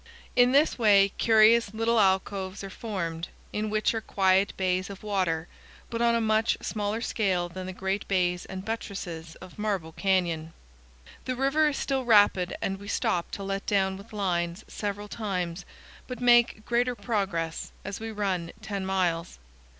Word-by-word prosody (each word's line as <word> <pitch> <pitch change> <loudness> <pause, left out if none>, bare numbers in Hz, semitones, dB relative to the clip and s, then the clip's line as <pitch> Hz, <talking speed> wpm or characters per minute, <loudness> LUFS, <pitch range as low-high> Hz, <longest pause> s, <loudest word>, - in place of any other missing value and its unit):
In 245 0 +5
this 285 0 +3
way 200 -3 +6
curious 220 -1 +5
little 225 +1 +2
alcoves 190 0 +1
are 195 - -7
formed, 170 -7 -4 0.3
in 210 +1 -1
which 215 +2 +1
are 225 - -2
quiet 195 -1 +2
bays 185 0 0
of 200 +1 -9
water, 180 -6 0 0.4
but 230 0 -2
on 235 0 +4
a - - +2
much 220 0 +2
smaller 210 +1 -2
scale 190 -7 0
than 185 +1 -7
the - - -4
great 190 +2 -3
bays 180 -2 +1
and 190 0 -7
buttresses 180 -7 -5
of 185 +2 -13
Marble 195 -6 -2
Canyon. 170 -4 0 0.7
The 255 - -2
river 275 +4 +2
is 295 - -1
still 270 -1 -1
rapid 205 -6 +4
and 195 0 -2
we 200 - -10
stop 175 -3 0
to 200 - -4
let 195 0 -3
down 190 -2 +2
with 200 +3 -12
lines 180 -2 -2
several 205 0 -4
times, 180 -5 -3 0.4
but 250 -2 -6
make 240 -3 +4
greater 245 +1 +1
progress, 190 -9 -2
as 200 0 -5
we 225 0 -5
run 190 -5 -2
ten 200 -3 -3
miles. 180 -3 -1
200 Hz, 165 wpm, -27 LUFS, 185-220 Hz, 0.7 s, way